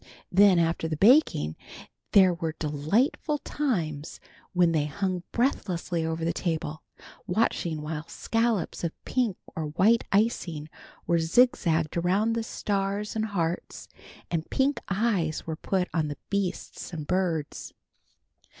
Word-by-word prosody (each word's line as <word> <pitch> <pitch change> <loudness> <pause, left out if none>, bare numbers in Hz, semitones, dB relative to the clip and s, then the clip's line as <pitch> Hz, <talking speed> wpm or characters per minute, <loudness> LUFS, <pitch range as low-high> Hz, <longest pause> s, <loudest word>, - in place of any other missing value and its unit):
Then 195 0 +6
after 165 -1 +1
the 155 -1 -3
baking 200 - +4 0.6
there 190 -3 +7
were 165 -2 -3
delightful 165 - 0
times 170 - -2 0.3
when 175 -2 +3
they 155 -3 +1
hung 185 +3 -2
breathlessly 180 -9 0
over 160 0 -2
the 170 - +1
table, 160 -3 -3 0.5
watching 175 -5 0
while 155 0 -5
scallops 225 -7 -1
of 170 - -1
pink 240 -7 0 0.2
or 160 - -2
white 200 +10 +3
icing 175 -8 0 0.4
were 170 -1 +2
zigzagged 165 -4 +2
around 195 +6 +2
the 230 - 0
stars 205 -1 -2
and 220 0 0
hearts, 175 -5 -3 0.4
and 165 -2 -2
pink 275 +2 +1
eyes 190 -6 0
were 160 - -3
put 185 +2 -1
on 160 -3 +1
the 145 - -5
beasts 195 -3 -3
and 155 -4 -5
birds. 170 -4 -1
175 Hz, 130 wpm, -27 LUFS, 160-210 Hz, 0.6 s, there